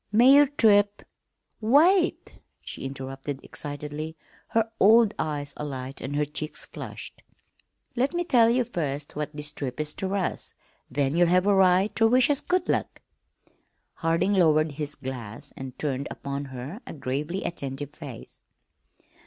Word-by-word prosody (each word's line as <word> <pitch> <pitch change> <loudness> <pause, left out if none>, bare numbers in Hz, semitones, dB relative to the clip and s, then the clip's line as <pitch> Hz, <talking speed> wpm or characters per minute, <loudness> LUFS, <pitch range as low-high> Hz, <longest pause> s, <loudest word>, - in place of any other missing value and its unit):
"May 240 +5 +6
your 290 0 +7
trip 205 -6 +3 0.3
" - - -49 0.2
"Wait!" 355 +3 +3 0.2
she - - -8
interrupted 135 +1 -5
excitedly, 150 +2 -6 0.3
her 225 0 0
old 220 +1 +6
eyes 145 -2 -2
alight 135 -2 -5
and 140 +2 -4
her 150 0 +1
cheeks 150 +1 -5
flushed. - - -8 0.7
"Let 260 +3 +1
me 345 0 -1
tell 240 -9 +5
ye 250 +2 +3
first 150 - -4
what 150 0 -3
this 150 0 -4
trip 130 -3 -5
is 150 0 -2
ter 190 +1 -3
us, 190 -3 -3 0.3
then 140 +2 0
ye'll 175 0 +4
have 180 +2 +3
a 205 - +4
right 190 +1 +4
ter 225 0 +4
wish 250 +4 +4
us 285 - 0
good 360 0 0
luck." - - -2 0.9
Harding 165 +5 +1
lowered 155 -4 +4
his 145 0 -4
glass 125 -5 -7
and 130 -1 -8
turned 140 -2 -2
upon 140 0 -5
her 130 - -7
a - - -6
gravely 150 +6 -3
attentive 140 -3 -4
face. 145 -6 -10
155 Hz, 155 wpm, -26 LUFS, 140-210 Hz, 0.9 s, your